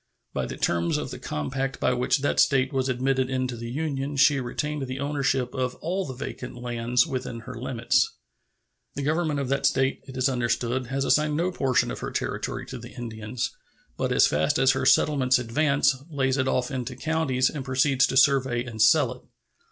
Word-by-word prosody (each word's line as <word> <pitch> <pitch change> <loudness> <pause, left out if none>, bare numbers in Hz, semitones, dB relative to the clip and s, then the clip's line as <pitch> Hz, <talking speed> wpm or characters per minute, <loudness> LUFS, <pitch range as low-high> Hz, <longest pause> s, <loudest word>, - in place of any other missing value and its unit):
By - - -2
the - - -6
terms 85 0 +1
of - - -4
the - - -7
compact 135 - -3
by - - +2
which 125 +3 +1
that 145 - 0
State 135 0 +3
was 135 0 0
admitted 130 +1 0
into 130 -1 -1
the 115 0 -6
Union 140 0 -3
she 140 +1 +5
retained 145 +3 -3
the 130 +1 -5
ownership 135 -3 0
of 130 -1 -2
all 185 +3 -3
the 130 - -6
vacant 130 -1 -6
lands 120 0 +1
within 125 -3 -4
her 125 +3 -8
limits. 120 0 0 0.8
The 140 - -3
government 155 0 0
of 140 - -2
that 140 - +2
State, 135 0 +1
it 130 -1 -8
is 130 +1 +2
understood, 125 0 -1
has 135 +2 -1
assigned 150 +1 +2
no 175 +3 0
portion 135 - +1
of - - -6
her - - -4
territory - - -3
to 130 - -7
the 120 +1 -11
Indians, 115 -1 -4 0.4
but - - -2
as - - +5
fast 75 +2 +1
as 130 -1 +5
her 130 0 0
settlements 135 -4 +4
advance 135 +3 +2
lays 135 -3 0
it 130 -1 +1
off 125 +1 0
into 130 -1 -4
counties 135 -3 0
and 145 -3 -5
proceeds 130 +1 +2
to 130 - -1
survey 130 -3 +3
and 115 -3 -5
sell - - +5
it. - - -16
130 Hz, 195 wpm, -26 LUFS, 125-140 Hz, 0.8 s, she